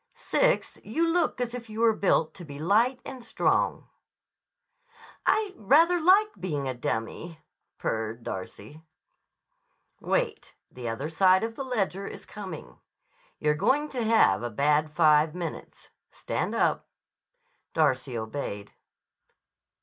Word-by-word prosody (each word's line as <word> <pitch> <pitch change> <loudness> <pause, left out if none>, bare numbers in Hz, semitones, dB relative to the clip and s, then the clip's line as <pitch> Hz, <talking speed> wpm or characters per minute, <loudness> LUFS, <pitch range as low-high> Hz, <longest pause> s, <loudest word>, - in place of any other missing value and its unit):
Sixth, - - +1
you 335 +1 0
look 330 -5 +1
as 245 -1 -2
if 235 -2 -7
you 215 +1 -5
were 230 -1 +5
built 185 -6 +1
to 180 - -11
be 145 -3 -9
light 220 - +2
and 260 -2 -8
strong." 230 - 0 1.4
"I 425 -3 +2
rather 330 - +4
like 390 +6 +5
being 145 -7 -3
a 130 - -1
dummy," 125 +7 -4 0.4
purred 110 +1 -3
Darcy. 105 +9 -7 1.2
"Wait. - - -2 0.2
The 120 -2 -6
other 115 +6 -3
side 185 +3 +4
of 225 0 -3
the 275 - -4
ledger 200 -6 -2
is - - -9
coming. 200 -3 -9 0.6
You're 150 - +1
going 265 - +1
to 245 -3 -3
have 220 - +4
a 120 - -3
bad 150 +6 +2
five 150 0 +4
minutes. 170 -3 -7 0.2
Stand - - -3
up." - - +1 0.9
Darcy 125 -3 +1
obeyed. 110 -3 -5
185 Hz, 125 wpm, -27 LUFS, -, 1.4 s, were